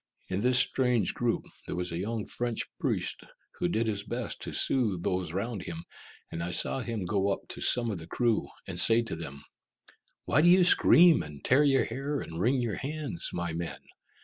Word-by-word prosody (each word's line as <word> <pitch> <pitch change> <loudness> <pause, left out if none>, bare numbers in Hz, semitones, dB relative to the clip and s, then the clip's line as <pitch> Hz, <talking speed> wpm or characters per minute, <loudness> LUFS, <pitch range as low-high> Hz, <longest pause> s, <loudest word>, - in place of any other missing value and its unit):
In 95 +2 -1
this 125 +2 +3
strange 125 -6 +2
group, 120 -1 -1 0.2
there - - -4
was 90 0 -3
a 85 - -3
young 110 +2 -3
French 120 -2 -3 0.2
priest - - -1 0.4
who - - +1
did 110 +6 0
his 105 -2 -2
best 120 +2 -4
to - - -4
soothe 105 -10 +1
those 90 -3 -1
round 100 +3 -3
him, 85 -1 -7 0.5
and 80 - -4
I 85 - -3
saw 90 +8 0
him 115 -5 -4
go 100 +1 0
up - - -2
to - - -7
some 120 -2 +2
of 95 - -4
the 80 - -10
crew, 120 -3 0 0.2
and - - -3
say 115 +1 +6
to 115 - -5
them, 70 -3 -8 0.8
"Why 140 - +3
do 175 - +5
you 180 +1 +6
scream, 175 -1 +6
and 75 -2 -10
tear 135 +4 +4
your 135 -2 +3
hair, 135 +4 -3
and 80 +1 -6
wring 125 +4 +2
your 115 -4 -2
hands, 145 - -3
my 85 -1 -3
men? 85 +1 -4
110 Hz, 200 wpm, -29 LUFS, 90-125 Hz, 0.8 s, say